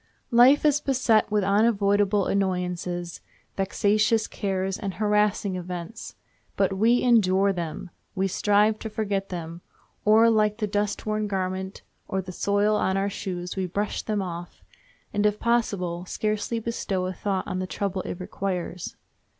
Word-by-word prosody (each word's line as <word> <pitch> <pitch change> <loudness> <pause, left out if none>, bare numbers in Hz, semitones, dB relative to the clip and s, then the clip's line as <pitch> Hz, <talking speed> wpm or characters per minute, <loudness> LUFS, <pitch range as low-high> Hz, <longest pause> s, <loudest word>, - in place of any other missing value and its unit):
Life 250 +6 +6
is 295 -1 +4
beset 250 -7 +2
with 210 -1 +1
unavoidable 205 -1 +3
annoyances, 180 -2 -2 0.3
vexatious 210 +3 +2
cares, 190 -1 -2
and 195 -4 -4
harassing 210 -1 +1
events. 180 +4 -6 0.4
But 195 -1 +2
we 230 +5 +3
endure 200 -5 +4
them—we 180 +3 -4
strive 210 +3 +2
to 220 - -5
forget 200 -2 -2
them—or, 180 +6 0
like 210 -1 +2
the 220 - -1
dustworn 210 +1 -1
garment, 190 -1 -3 0.2
or 190 - -1
the 185 -1 -5
soil 205 +3 +1
on 190 -1 +1
our 200 +1 0
shoes, 180 -3 -5
we 190 -1 -1
brush 205 +4 -2
them 210 -2 -2
off, 175 -1 -7 0.5
and, 205 - +1
if 210 0 +2
possible, 190 -7 0
scarcely 215 +3 -1
bestow 210 -5 -2
a 185 - -3
thought 190 +1 -2
on 185 - -3
the 185 - -3
trouble 195 0 -2
it 180 - -6
requires. 180 -2 -4
200 Hz, 140 wpm, -25 LUFS, 185-215 Hz, 0.5 s, Life